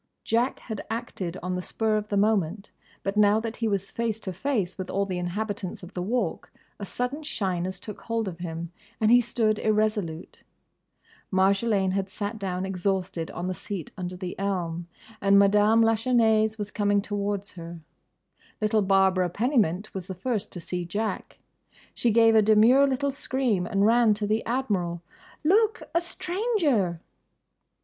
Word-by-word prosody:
Jack 235 +4 +1
had 220 -4 -6
acted 195 -6 -4
on 180 0 -2
the 180 - -2
spur 220 +3 0
of 210 0 -1
the 205 - -1
moment; 200 -2 +1 0.3
but 195 +1 -2
now 210 0 +5
that 225 0 -5
he 230 - 0
was 200 -2 -2
face 230 -2 -2
to 190 - -4
face 200 - -1
with 185 -2 -6
all 200 +1 0
the 185 -2 -3
inhabitants 195 +1 -4
of 180 +2 -10
the 180 - -3
Walk 235 +7 -2 0.3
a 200 - -5
sudden 250 +8 -2
shyness 185 - -2
took 210 +2 -9
hold 230 -2 -2
of 175 -2 -6
him 170 -1 -5 0.3
and 220 0 +3
he 245 0 +7
stood 220 -2 0
irresolute. 210 -6 -1 0.9
Marjolaine 195 +1 +2
had 195 0 -1
sat 205 +2 -4
down 185 -1 -2
exhausted 185 -3 -2
on 175 - -5
the 185 - -1
seat 180 -1 -6
under 180 -2 -5
the 180 -1 -5
elm, 175 -4 -2 0.3
and 200 0 +5
Madame 210 +3 +5
Lachesnais 225 -1 +3
was 210 -1 -4
coming 205 -1 +2
towards 205 -1 -2
her. 170 -1 -9 0.8
Little 215 0 +2
Barbara 190 -2 +3
Pennymint 215 - 0
was 185 -2 -5
the 190 - -5
first 215 +2 -2
to 175 - -6
see 180 +1 -4
Jack. 205 +6 -3 0.6
She 240 - +1
gave 225 0 +5
a 220 - +6
demure 220 +6 +6
little 275 +1 0
scream 255 -9 -1
and 200 -2 +2
ran 230 -1 +5
to 210 0 -2
the 215 +2 0
Admiral. 195 -9 -1 0.4
"Look! 425 +7 +3
A 340 - +3
stranger!" 345 - 0
205 Hz, 165 wpm, -26 LUFS, 185-225 Hz, 0.9 s, he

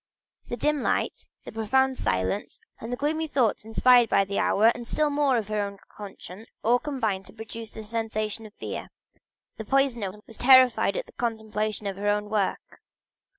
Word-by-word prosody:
The 240 - -4
dim 300 +3 +1
light, - - -1 0.2
the - - -7
profound 265 +5 +1
silence, 95 - -2 0.2
and 230 - -7
the 245 - -2
gloomy 315 +3 -1
thoughts 245 -7 +1
inspired 240 +1 +5
by 195 - +3
the 200 +1 -2
hour, 220 +3 +4
and 240 -1 -9
still 300 +3 +1
more 285 -2 +2
by 210 - -6
her 215 -1 0
own 200 0 -4
conscience, 200 0 -10 0.2
all 240 +3 +4
combined 220 -10 -2
to 190 - -11
produce 225 0 -8
a 220 - -6
sensation 220 0 -3
of 210 - -18
fear; - - -6 0.7
the 220 - -5
poisoner 240 -5 +1
was 225 - -10
terrified 260 - +5
at - - -3
the - - -17
contemplation 215 -3 -3
of 195 -1 -3
her 205 +1 -3
own 210 0 +1
work. 205 -3 -2
225 Hz, 180 wpm, -26 LUFS, 210-255 Hz, 0.7 s, inspired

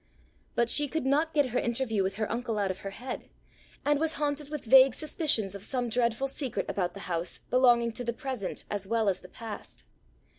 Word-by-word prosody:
But 235 - +3
she 290 +4 +4
could 315 -1 -2
not 300 +4 +2
get 290 -4 +2
her 250 - +1
interview 235 -3 0
with 190 0 -1
her 215 +1 -2
uncle 230 -2 -2
out 200 -2 +1
of 185 - -7
her 195 - -5
head, 250 +6 -7 0.6
and 290 0 +3
was 320 0 +1
haunted 290 -1 -2
with 300 -3 -5
vague 260 +1 +7
suspicions 295 - +1
of 200 - -7
some 245 +2 -2
dreadful 235 +2 +1
secret 270 -3 -3
about 180 -2 -2
the 200 - -7
house 170 -1 -3
belonging 240 -2 +4
to 235 +2 -4
the 235 - -1
present 250 -6 -4
as 200 -2 -3
well 225 0 +1
as 190 - -1
the 180 - -14
past. 225 +1 -9
235 Hz, 210 wpm, -29 LUFS, 210-275 Hz, 0.6 s, vague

